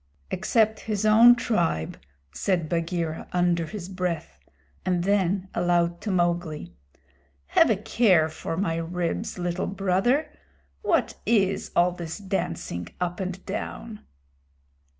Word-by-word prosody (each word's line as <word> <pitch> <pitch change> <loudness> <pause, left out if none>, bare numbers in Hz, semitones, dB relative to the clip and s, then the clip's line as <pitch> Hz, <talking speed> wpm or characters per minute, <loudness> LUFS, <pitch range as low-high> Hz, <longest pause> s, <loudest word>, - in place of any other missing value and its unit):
"Except 220 -2 +2
his 215 -1 -2
own 230 +3 +8
tribe," 80 - 0 0.4
said 175 - 0
Bagheera, 165 -1 -2
under 175 -2 +2
his 200 -3 -6
breath; 180 -3 -4 0.4
and 180 -2 0
then 195 -1 +1
aloud 175 0 +1
to 210 - -4
Mowgli, 175 - -1 0.8
"Have - - +5
a 220 - +4
care 205 -6 +3
for 160 +1 -5
my 170 -4 0
ribs, 175 +5 -3
Little 175 +1 -2
Brother! 195 +9 +1 0.5
What - - +1
is 200 -4 +2
all 175 +1 +4
this 170 -2 -6
dancing 90 - -3
up 180 +1 -2
and 185 0 -5
down?" 210 +2 -5
180 Hz, 120 wpm, -26 LUFS, 170-205 Hz, 0.8 s, own